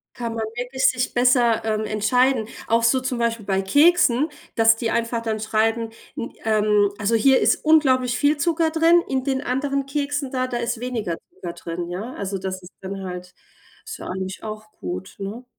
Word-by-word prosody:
Kann 235 -2 -4
man 225 -1 -2
wirklich 250 +2 -3
sich 250 0 -1
besser, 245 -2 +3
ähm, 215 -1 -1
entscheiden. 220 +3 +2 0.2
Auch 230 +1 +2
so 235 +3 +3
zum 255 -1 -3
Beispiel 230 -3 -1
bei 195 -1 +1
Keksen, 290 - +4 0.3
dass 225 0 +5
die 225 0 -2
einfach 230 0 -1
dann 220 -1 -2
schreiben 225 +1 0 0.3
n 230 - -5
ähm, 210 -2 +3
also, 205 +3 0
hier 260 +4 +5
ist - - +2
unglaublich 260 -6 +3
viel 290 +2 +3
Zucker 325 +2 +1
drin, 330 +2 +4
in 260 -1 -1
den 265 -1 0
anderen 275 +1 -1
Keksen 285 -1 -2
da, 255 -1 -1
da 245 -1 -2
ist 235 0 -2
weniger 230 -9 -3 0.2
Zucker 175 - -6
drin, 170 +1 -5
ja? 195 +8 -5
Also, 200 0 -4
das 185 0 -5
ist 180 - -13
dann 195 +1 -6
halt 180 0 -7 0.5
ist - - -7
ja - - -8
eigentlich 190 +1 -5
auch 215 0 -7
gut, 185 -2 -7
ne? 205 +5 -6
230 Hz, 190 wpm, -22 LUFS, 210-260 Hz, 0.5 s, dass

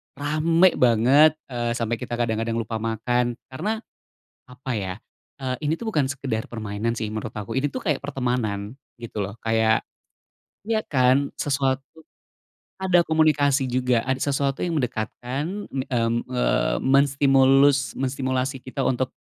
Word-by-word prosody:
rame 165 +5 +3
banget, 130 +6 +5 0.2
eee, 120 -1 -1
sampe 115 -1 -2
kita 120 - -4
kadang-kadang 115 -1 -1
lupa 115 -1 -3
makan. 120 +2 0 0.2
Karena 210 +12 -2 0.7
apa 125 +1 -7
ya, 95 -2 -3 0.5
eee, 130 -1 -2
ini 155 - +2
tuh 230 -1 -3
bukan 150 -8 +1
sekedar 130 -4 -3
permainan 110 0 -3
sih 110 -2 -3
menurut 110 0 -5
aku, 105 +4 -5
ini 140 - +1
tuh 260 - -4
kayak 150 -7 0
pertemanan 125 -5 -2 0.2
gitu 110 -3 -4
loh, 100 - -7
kayak 110 0 +2 0.8
ya 220 0 +1
kan, 130 -3 +2
sesuatu 135 -1 0 0.9
ada 185 -2 +3
komunikasi 145 -4 +2
juga, 125 -1 +1
ada 130 0 0
sesuatu 140 -1 0
yang 170 -3 0
mendekatkan, 130 - -3
mmm, 120 -3 -1
eee, 140 +5 +1
menstimulus 135 0 +4
menstimulasi 130 0 -1
kita 130 +1 -3
untuk 130 0 0
130 Hz, 135 wpm, -24 LUFS, 115-140 Hz, 0.9 s, banget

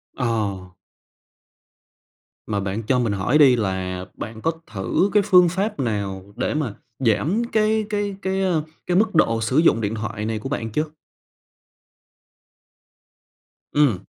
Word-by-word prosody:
Ờ. 105 -7 -2 1.8
Mà 105 -2 -1
bạn 100 +3 -3
cho 125 -2 +3
mình 115 -4 0
hỏi 100 +9 +2
đi 135 -5 +7
là 95 -3 -2
bạn 110 -1 -7
có 165 - +1 0.2
thử 95 - +1
cái 210 -1 +5
phương 180 -4 +6
pháp 200 +3 -2
nào 100 -5 -3
để - - -1
mà 145 -8 -2 0.3
giảm 135 - +1
cái 215 0 +2
cái 205 -2 -1
cái, 190 0 -1
a, 185 - +2 0.4
cái 180 - +2
mức 215 -2 +2
độ 115 -7 +3
sử 120 +5 0
dụng 155 -8 +4
điện 105 +1 -1
thoại 110 -1 -4
này 110 0 -2
của 135 - -6
bạn 115 -5 -3
chưa? 150 +8 0 2.9
Ừm. 125 -11 +2
115 Hz, 145 wpm, -22 LUFS, -, 2.9 s, đi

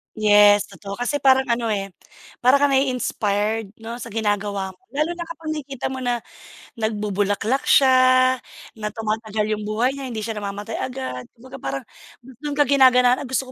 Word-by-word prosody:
Yes, 205 -1 +6
totoo. 200 -1 -8
Kasi 245 +6 -2
parang 265 -1 +5
ano, 235 0 0
eh, 195 -2 -2 0.5
parang 255 +3 +4
kang 285 - +4
nai-inspired, 220 -5 0
'no, 230 +2 -6
sa 235 - -7
ginagawa 205 -3 -2
mo. - - -25 0.2
Lalo 305 +3 0
na 345 -1 -6
kapag 330 -1 -6
nakikita 280 -4 -4
mo 260 - -5
na 245 -2 -2 0.6
nagbubulaklak 210 +2 -1
siya, 255 -1 +5 0.4
na 210 - -3
tumatagal 220 -1 -2
yung 210 -1 -3
buhay 225 +5 +1
niya, 275 -1 -6
hindi 225 -3 -5
siya 220 -1 -4
namamatay 205 +2 -5
agad. 255 - -5
Kumbaga 260 +3 -12
parang 135 - -4 0.4
dun 265 +4 -7
ka 295 - +4
ginaganahan, 255 -1 +4
gusto 260 0 -2
235 Hz, 160 wpm, -22 LUFS, 210-265 Hz, 0.6 s, Yes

